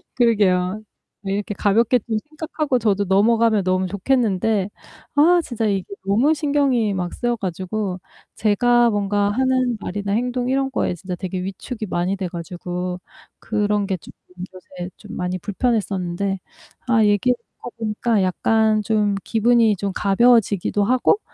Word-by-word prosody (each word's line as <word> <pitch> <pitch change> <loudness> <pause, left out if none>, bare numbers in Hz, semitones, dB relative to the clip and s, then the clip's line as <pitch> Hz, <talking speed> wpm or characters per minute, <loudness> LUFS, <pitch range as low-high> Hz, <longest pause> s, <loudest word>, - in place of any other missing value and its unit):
그러게요. 205 -4 +2 0.4
네. 195 -1 -3
이렇게 205 0 -3
가볍게 230 +5 +3
좀 220 0 -3
생각하고 305 -4 -2
저도 205 -2 +1
넘어가면 215 +2 +3
너무 185 0 +1
좋겠는데 205 -2 0 0.5
아 340 +4 +5
진짜 230 -4 -3
이게 195 -3 -1 0.2
너무 235 +11 +3
신경이 280 -8 +1
막 180 -2 -3
쓰여 240 -1 -1
가지고 190 0 -3 0.4
제가 240 +3 +3
뭔가 205 0 +1
하는 255 -1 +1
말이나 200 +1 -4
행동 245 +2 -1
이런 270 0 0
거에 180 - -1
진짜 180 +1 -6
되게 185 0 -4
위축이 215 +4 -5
많이 180 +3 -1
돼 185 -2 -3
가지고 180 +1 -5 0.4
그런 210 -2 0
게 190 -2 -1
좀 - - -14 0.4
요새 180 -1 -9
좀 - - -10
많이 180 0 -2
불편했었는데 195 -3 -1 0.5
아 225 -3 +4
얘기하다 210 +4 +2 0.4
보니까 215 -1 0
약간 215 +3 +2
좀 210 -1 +1
기분이 230 -1 +3
좀 200 0 -2
가벼워지기도 205 -1 +3
하고 255 - +3
210 Hz, 310 characters per minute, -21 LUFS, 190-240 Hz, 0.5 s, 아